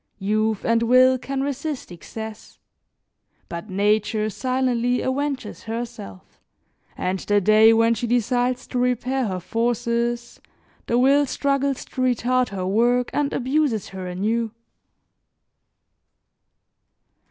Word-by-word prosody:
Youth 215 +1 0
and 230 0 +2
will 255 +2 +5
can 270 +2 -3
resist 280 - -4
excess; 220 +5 -9 0.9
but 170 +5 -7
nature 210 +2 +1
silently 250 0 0
avenges 260 -5 -3
herself, 225 - -7 0.6
and 185 +1 -1
the 205 +2 +2
day 215 +3 +6
when 230 0 +4
she 240 +1 -3
decides 245 +1 0
to 250 - -3
repair 250 +1 0
her 185 -2 -3
forces, 235 +3 -2 0.5
the 235 - +1
will 275 +3 +4
struggles 275 0 -1
to 260 - -6
retard 255 0 +1
her 190 -2 -4
work 240 +5 +2
and 290 -1 0
abuses 260 -5 0
her 190 -1 -7
anew. 220 +6 -1
235 Hz, 110 wpm, -23 LUFS, 215-255 Hz, 0.9 s, day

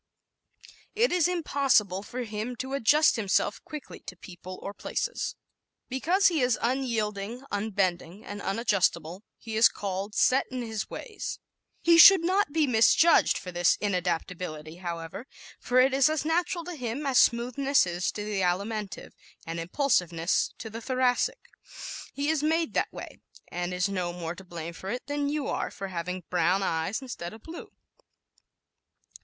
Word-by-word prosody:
It 465 +3 +3
is 355 -3 +3
impossible 275 - +1
for 245 +5 -5
him 220 +2 -4
to 265 +3 -5
adjust 285 +3 +4
himself 205 0 0
quickly 305 -4 -9
to 180 - -6
people 185 +1 -10
or 200 - -5
places. - - -3 0.5
Because 345 +10 +1
he 325 -5 0
is 250 -2 +2
unyielding, 235 -2 -2
unbending 200 -2 -2
and 205 0 -7
unadjustable 195 -4 0 0.2
he 225 -1 -7
is 220 +1 +7
called 200 +1 -4
"sot 260 +1 +3
in 255 -1 -4
his 220 -2 -4
ways." 435 -5 -6 0.5
He 335 0 +6
should 380 0 +10
not 370 -2 +2
be 315 0 +2
misjudged 255 +7 +5
for 180 - -7
this 175 -1 +3
inadaptability, 175 -4 -3
however, 170 +6 -6 0.3
for 250 +1 +2
it 260 +1 +4
is 275 +2 +4
as 310 -1 -1
natural 340 +1 0
to 355 +1 -6
him 255 0 -4
as 270 -2 +4
smoothness 255 +3 +3
is 175 0 -2
to 210 - -5
the 210 -2 -2
Alimentive 195 +2 -2 0.3
and 165 +1 -4
impulsiveness 175 - +1
to 220 - -8
the 230 +2 -7
Thoracic. 255 - 0 0.6
He 280 +1 -3
is 315 -2 +1
made 320 +1 +1
that - - 0
way - - -9 0.3
and 175 0 -3
is 180 +2 0
no 180 -3 -2
more 170 -1 -5
to 190 - -12
blame 170 -2 -7
for 190 +3 -8
it 245 +4 -4
than 285 +1 -1
you 295 -1 -2
are - - -2
for 195 -1 -7
having 180 +1 -4
brown 180 +2 +2
eyes 175 +8 -1
instead 175 -9 -6
of 220 - -13
blue. 330 +1 -9
220 Hz, 160 wpm, -27 LUFS, 180-280 Hz, 0.6 s, should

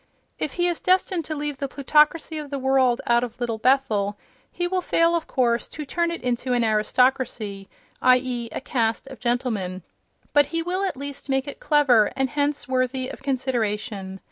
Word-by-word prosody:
If 295 - -2
he 350 0 +1
is 345 -2 -1
destined 365 -2 +1
to 310 - -4
lead 295 -1 -3
the 275 - -3
plutocracy 300 +3 +2
of 295 -1 -7
the 280 - -3
world 260 -2 +2
out 235 0 +3
of 245 -1 -6
Little 230 -2 -2
Bethel 215 -6 +2 0.3
he 350 - -2
will 365 +1 0
fail, 335 -1 +2
of 335 - -2
course, 240 -2 +1
to 300 - -7
turn 340 +4 0
it 335 - -5
into 250 0 -1
an 240 -1 +2
aristocracy—i. 220 0 +1
e., 245 -2 -4
a - - -5
caste 230 -3 -1
of 270 -1 -11
gentlemen—, 220 -7 -2 0.5
but 290 -1 +5
he 330 0 -2
will 365 +3 -1
at 375 - -3
least 280 +1 -6
make 270 +1 0
it 285 - -7
clever, 265 -8 +4
and 265 -1 0
hence 290 0 -1
worthy 255 0 -1
of - - -9
consideration. 220 -7 -2
260 Hz, 185 wpm, -24 LUFS, 235-295 Hz, 0.5 s, but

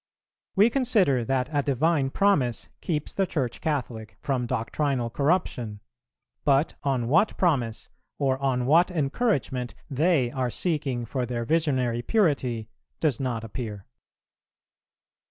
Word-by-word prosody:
We 215 +4 +5
consider 210 - +2
that 130 +1 0
a 145 - +3
divine 140 +1 +1
promise 140 - +1
keeps 155 -3 -2
the 195 -1 +1
Church 130 -9 -2
Catholic 120 -8 -3
from 130 -3 -1
doctrinal 120 +1 -1
corruption; 130 - 0 0.6
but 140 +2 +3
on 130 -4 0
what 165 - +3
promise, 125 - 0 0.3
or 135 -2 +1
on 130 -3 0
what 165 +7 +5
encouragement, 140 - -1 0.2
they 140 -3 +2
are 130 -1 -1
seeking 140 -5 -1
for 125 +1 -2
their 120 -1 -3
visionary 130 -6 +1
purity 130 - +1 0.3
does 145 -7 +1
not 120 -4 -2
appear." 105 -3 -6
135 Hz, 120 wpm, -26 LUFS, 120-160 Hz, 0.6 s, We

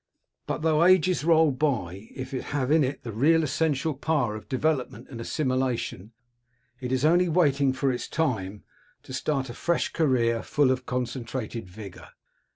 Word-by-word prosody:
But - - -3
though 160 0 +3
ages 185 -2 +4
roll 160 -2 +5
by, 115 - -2
if 130 +1 -6
it 130 - -3
have 135 -1 0
in 155 -1 +5
it 135 +2 -3
the 115 - -5
real 155 +9 +3
essential 155 +1 0
power 135 -5 0
of 110 - -10
development 130 -4 -1
and 115 -3 -7
assimilation, 125 - -2 0.7
it 125 -2 -4
is 130 +2 +1
only 175 +3 +4
waiting 145 -5 +3
for 135 +1 0
its 125 - -4
time 105 - -2 0.4
to - - -10
start 135 -1 -1
a - - -8
fresh 170 +6 0
career, 120 -7 +2
full 145 -3 +2
of 130 -1 -2
concentrated 120 -3 -4
vigour. 100 0 -10
130 Hz, 165 wpm, -26 LUFS, 120-155 Hz, 0.7 s, roll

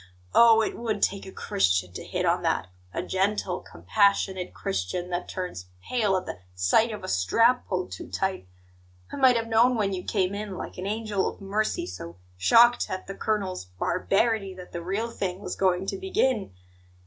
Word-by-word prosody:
Oh! 225 -1 +7
it - - -2
would 220 -3 -2
take 195 -1 0
a - - -8
Christian 90 - 0
to - - -6
hit - - -2
on - - +2
that 90 - 0 0.2
a - - -3
gentle, 190 -1 0
compassionate 195 -3 +1
Christian, 95 - -3
that 175 0 -3
turns 180 - -5 0.2
pale 210 -6 +2
at 185 - -4
the 90 - -6 0.2
sight 90 - +3
of 210 - -7
a - - -5
strap 230 - +3
pulled 185 -1 -2
too - - -7
tight! 190 - -2 0.6
I - - -5
might 260 -2 +6
have 230 -1 0
known 230 +3 +4
when 200 -3 0
you 180 -1 -4
came 190 -2 0
in, 205 -2 -5
like - - -7
an 185 - -3
angel 210 -2 -1
of - - -12
mercy 205 +2 -1
so 85 -2 -8 0.2
shocked 235 - +5
at 185 - -4
the 195 - -6
colonel's 195 - -2
'barbarity' 195 - 0
that 180 -1 -11
the 170 - -5
real 200 +7 -2
thing 185 -4 -3
was 190 -3 -5
going 185 -1 +1
to 195 - -3
begin! 265 - 0
195 Hz, 185 wpm, -26 LUFS, 180-220 Hz, 0.6 s, Oh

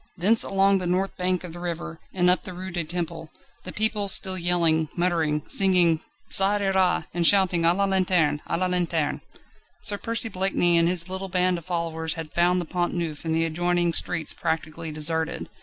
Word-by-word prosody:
Thence 210 +6 +4
along 195 0 +2
the 180 - -3
north 185 +2 -1
bank 180 -1 -2
of 175 -2 -8
the 175 - -9
river, 170 -1 -6
and 180 -1 +1
up 180 +1 +3
the 185 - -9
Rue 185 +1 -7
du 175 -1 -2
Temple, 165 -1 -5 0.4
the 185 - -5
people 215 -1 -1
still 190 -1 +2
yelling, 170 -3 +1
muttering, 165 -4 0
singing 180 -4 +3 0.3
the - - -4
"Ça 200 +2 +4
ira," 190 -2 +1
and 170 -1 +3
shouting: 185 -4 +4
"A 170 - +5
la 200 +1 +1
lanterne! 180 -6 +1
A 165 - -1
la 185 - 0
lanterne!" 175 -4 -1 0.6
Sir 205 -2 -4
Percy 230 +1 0
Blakeney 185 -3 0
and 170 - +2
his 175 -1 +2
little 190 +1 -5
band 180 -1 +1
of 165 - -18
followers 165 -2 -2
had 160 -2 -8
found 175 +1 +2
the 175 - -4
Pont 175 +2 -2
Neuf 165 -3 -4
and 160 0 -1
the 165 0 +1
adjoining 175 +1 0
streets 165 -2 +1
practically 160 0 -4
deserted. 160 +1 0
175 Hz, 195 wpm, -24 LUFS, 165-185 Hz, 0.6 s, A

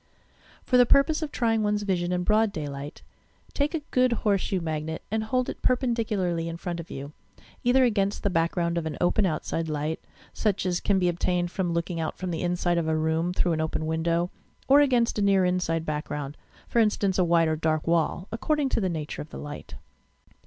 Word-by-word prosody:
For 250 - +3
the 245 -1 +6
purpose 305 +5 +4
of 305 -2 -3
trying 225 -2 +1
one's 210 0 0
vision 180 -3 0
in 180 0 0
broad 215 +2 +3
day 155 -6 -4
light, 140 +2 -7 0.5
take 295 +3 0
a 310 - -3
good 255 -1 +3
horseshoe 195 -2 +1
magnet 160 -1 -4
and 220 0 0
hold 255 +2 0
it - - -6
per 255 - +4
pendicularly 210 -9 -1
in 165 0 -5
front 175 0 -4
of 170 - -8
you, 140 +2 -7 0.2
— - - -25
either 255 +2 +4
against 205 -4 +1
the 200 - +1
back 165 0 +1
ground 170 -1 0
of 160 - -4
an 155 - -5
open 190 +3 +2
outside 160 0 -2
light, 155 +1 -2 0.3
such 205 -3 0
as 180 -1 0
can 200 - +1
be 180 -1 +2
obtained 175 0 0
from 185 -3 -1
looking 170 0 -2
out 160 - -3
from 185 -1 -4
the 165 - -3
inside 175 -1 +1
of 165 - -2
a 160 0 +1
room 160 +2 0
through 180 -1 +1
an 160 - -1
open 160 0 -2
window, 165 +2 0 0.4
or 280 +2 +7
against 245 -6 +2
a - - +1
near 195 -2 +4
inside 170 -3 0
background, 150 -2 -4 0.2
— - - -27
for 235 - +1
instance 205 -3 +2
a - - +5
white 170 -1 +3
or 160 - +1
dark 155 0 0
wall, 170 +2 +1
according 285 +5 0
to 230 - 0
the 190 - 0
nature 155 -3 -4
of 150 - -9
the - - -9
light. 145 0 -8
175 Hz, 220 wpm, -26 LUFS, 160-215 Hz, 0.5 s, or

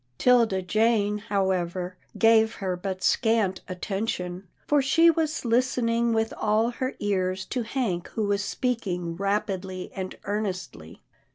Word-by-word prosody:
'Tilda 230 -7 +3
Jane, 210 +1 +2
however, 185 -4 -1 0.2
gave 225 0 +4
her 185 -2 -2
but 185 +1 -5
scant 220 -5 +2
atten 195 +3 -3
tion, 180 -1 -4 0.2
for 295 -1 +3
she 330 +5 +5
was 315 -3 -1
listening 235 -1 +2
with 225 0 0
all 220 +2 +2
her 260 +2 -3
ears 190 -2 -1
to 250 - -2
Hank 225 -7 -2
who 220 - 0
was 200 0 0
speaking 195 -7 -2
rapidly 195 -1 -2
and 185 -1 -5
earnestly. 185 - -4
205 Hz, 130 wpm, -26 LUFS, 185-230 Hz, 0.2 s, she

